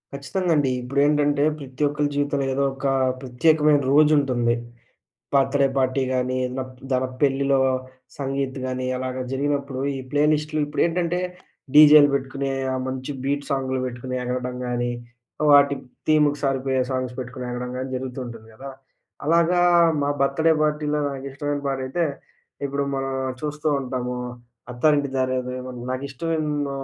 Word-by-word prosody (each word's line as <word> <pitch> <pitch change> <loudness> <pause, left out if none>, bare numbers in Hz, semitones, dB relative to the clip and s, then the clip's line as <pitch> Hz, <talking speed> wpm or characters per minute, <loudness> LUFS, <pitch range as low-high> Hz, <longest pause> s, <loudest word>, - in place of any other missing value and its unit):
ఖచ్చితంగా 175 +6 -2
అండి. 145 -3 +2
ఇప్పుడేంటంటే, 145 +2 +2 0.2
ప్రతి 135 -1 -9
ఒక్కలి 145 0 0
జీవితంలో 145 -1 0
ఏదో 140 +1 +1
ఒక 135 +1 -3 0.3
ప్రత్యేకమైన 150 +3 +3
రోజుంటుంది. 140 -5 +4 0.8
బర్త్‌డే 140 0 +3
పార్టీ 130 +1 +1
కానీ, 130 0 0
ఏదైనా 130 0 -3 0.2
పెళ్ళిలో 140 0 +3 0.6
సంగీత్ 135 -1 -2
గానీ, 130 0 -3
అలాగా 130 0 -3
జరిగినప్పుడు 140 -1 -1 0.2
ఈ - - -4
ప్లే 145 0 +3
లిస్టులు 155 0 -1
ఇప్పుడేంటంటే, 170 +3 0 0.5
డీజేలు 150 -1 +9
పెట్టుకుని, 135 0 -2 0.2
ఆ - - -1
మంచి 130 +1 -5
బీట్ 140 +1 -1
సాంగ్లు 130 -1 -1
పెట్టుకుని 125 +1 -5
ఎగరడం 125 0 -3
గానీ, 120 0 -1 0.6
వాటి 140 0 +6 0.3
థీమ్‌కి 150 -1 +4
సారిపోయే 135 -1 0
సాంగ్స్ 130 -1 -3
పెట్టుకుని 125 0 -6
ఎగరడం 125 0 -4
గానీ 130 +1 -4
జరుగుతూ 130 0 -5
ఉంటుంది 115 -2 -10
గదా! 135 +5 -8 0.6
అలాగా 170 +2 +3 0.4
మా 140 - +1
బర్త్‌డే 160 +4 +3
పార్టీలో 150 0 0
నాకిష్టమైన 140 +1 -4
పాట 135 -1 -1
అయితే, 170 +6 0 0.6
ఇప్పుడు 140 +1 -2
మనం 135 0 -2 0.3
చూస్తూ 150 +1 -2
ఉంటాము. 125 -1 -3 0.5
'అత్తారింటికి 140 +2 +1
దారేదిలో' 130 0 -2 0.2
నాకు 130 +2 -4
ఇష్టమైన 150 0 -2
135 Hz, 125 wpm, -23 LUFS, 130-145 Hz, 0.8 s, డీజేలు